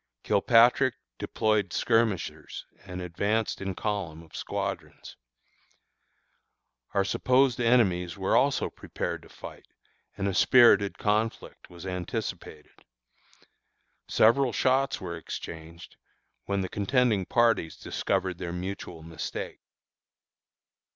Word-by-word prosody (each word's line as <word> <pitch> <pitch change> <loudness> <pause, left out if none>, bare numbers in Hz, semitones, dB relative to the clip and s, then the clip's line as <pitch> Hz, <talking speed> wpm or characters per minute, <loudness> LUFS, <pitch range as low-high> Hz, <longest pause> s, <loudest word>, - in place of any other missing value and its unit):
Kilpatrick 120 +4 +4 0.2
deployed 110 -4 0
skirmishers 115 -4 -1 0.2
and 90 -1 -6
advanced 100 +6 -1
in 95 -1 -3
column 90 -7 -3
of 80 - -16
squadrons. - - -5 1.8
Our 100 -1 +3
supposed 130 +3 +2
enemies 100 -7 +2
were 95 -1 +1
also 140 -1 +2
prepared - - -5
for - - -17
fight, - - -11 0.5
and 100 -1 -1
a 100 - -1
spirited 100 -2 +5
conflict 110 +2 -2
was 85 0 -11
anticipated. 90 -4 -6 1.2
Several 125 +3 +4
shots 130 +5 +1
were 85 -2 -5
exchanged, 85 0 -9 0.5
when 100 -1 -1
the 95 - -3
contending 105 -1 +1
parties 115 -10 +2
discovered 90 -2 -2
their 85 - -4
mutual 90 -2 -6
mistake. 80 -1 -6
100 Hz, 100 wpm, -27 LUFS, 90-115 Hz, 1.8 s, spirited